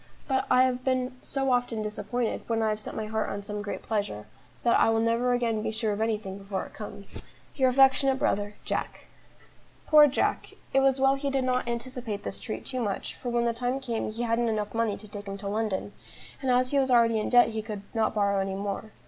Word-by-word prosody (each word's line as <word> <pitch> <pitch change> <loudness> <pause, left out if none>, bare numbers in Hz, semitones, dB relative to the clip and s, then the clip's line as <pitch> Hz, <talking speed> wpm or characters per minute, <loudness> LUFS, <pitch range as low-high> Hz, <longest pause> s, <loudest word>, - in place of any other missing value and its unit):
But 265 -1 0
I 255 0 +6
have 255 -1 0
been 255 0 0
so 270 -1 -1
often 245 -3 0
disappointed 215 +3 -2
when 225 -1 0
I 220 - +2
have 215 0 -1
set 215 - -7
my 215 - -3
heart 215 0 -2
on 200 0 -4
some 210 0 -4
great 205 - -5
pleasure, 200 - -2 0.4
that 235 - +4
I - - +5
will 225 0 +2
never 230 +2 +2
again 235 -3 +1
be - - -2
sure 220 -1 -1
of 205 - -3
anything 210 -3 -2
before 195 -1 -4
it - - -14
comes. 205 -2 -8 0.3
"Your 260 -3 +3
affectionate 270 +1 +4
brother, 205 -5 0
"JACK." - - -3 0.8
Poor 300 -1 +8
Jack! 280 - -1 0.2
it 270 - +5
was 270 0 +3
well 270 0 +5
he 275 +1 -2
did 270 -1 0
not 255 0 0
anticipate 235 -3 -4
this - - -5
treat 215 - -6
too 255 -2 -3
much, 205 -4 -3
for 245 - -6
when 235 0 +1
the 235 - +1
time 245 +3 -1
came 235 -5 -3
he 230 +2 -4
hadn't 230 0 +1
enough 210 -1 -2
money 225 -2 0
to 215 - -11
take 205 0 -8
him 195 0 -4
to 200 0 -6
London, 205 -1 -2 0.5
and 265 - -1
as 255 0 +3
he 285 - +3
was 265 -1 +1
already 230 -2 +4
in 215 - -2
debt 245 -1 +6
he 220 -1 -3
could 210 -2 -6
not 220 -1 +1
borrow 200 -1 +2
any 195 0 -2
more. 200 +2 -4
230 Hz, 230 wpm, -28 LUFS, 210-255 Hz, 0.8 s, Poor